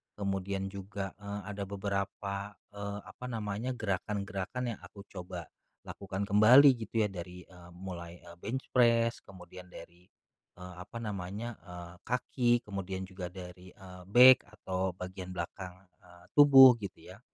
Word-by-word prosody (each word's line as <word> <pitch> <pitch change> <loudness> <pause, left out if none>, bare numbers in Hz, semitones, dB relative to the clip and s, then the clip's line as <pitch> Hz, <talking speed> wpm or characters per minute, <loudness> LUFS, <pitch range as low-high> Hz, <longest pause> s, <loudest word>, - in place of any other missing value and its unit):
kemudian 95 -1 -3
juga, 100 0 -6
eee, 100 0 -5
ada 100 -1 -5
beberapa, 100 0 -4 0.2
eee, 100 0 -5
apa 125 - -11
namanya 110 +2 -3
gerakan-gerakan 100 +2 -3
yang - - -8
aku 100 -1 -12
coba 90 -2 -7 0.4
lakukan 100 0 -5
kembali 115 +8 +7 0.2
gitu 115 -2 +1
ya 105 - -1
dari, 90 -1 -8
eee, 90 -2 -16
mulai, 85 -2 -8
eee, 85 0 -13
bench 125 +8 -5
press, 115 -2 +3
kemudian 90 -1 -12
dari, 90 +1 -14 0.5
eee, 90 0 -10
apa 115 +5 -8
namanya, 105 +3 -5
eee, 90 0 -9
kaki, 120 0 +1
kemudian 95 -2 -5
juga 95 -1 -7
dari, 90 0 -11
eee, 90 -1 -12
back 125 +4 +8
atau 95 -3 -3
bagian 90 0 -7
belakang, 90 +2 -6 0.2
eee, 85 -1 -19
tubuh 135 -4 +9
gitu 100 -3 -9
ya. - - -13
100 Hz, 140 wpm, -31 LUFS, 90-105 Hz, 0.5 s, tubuh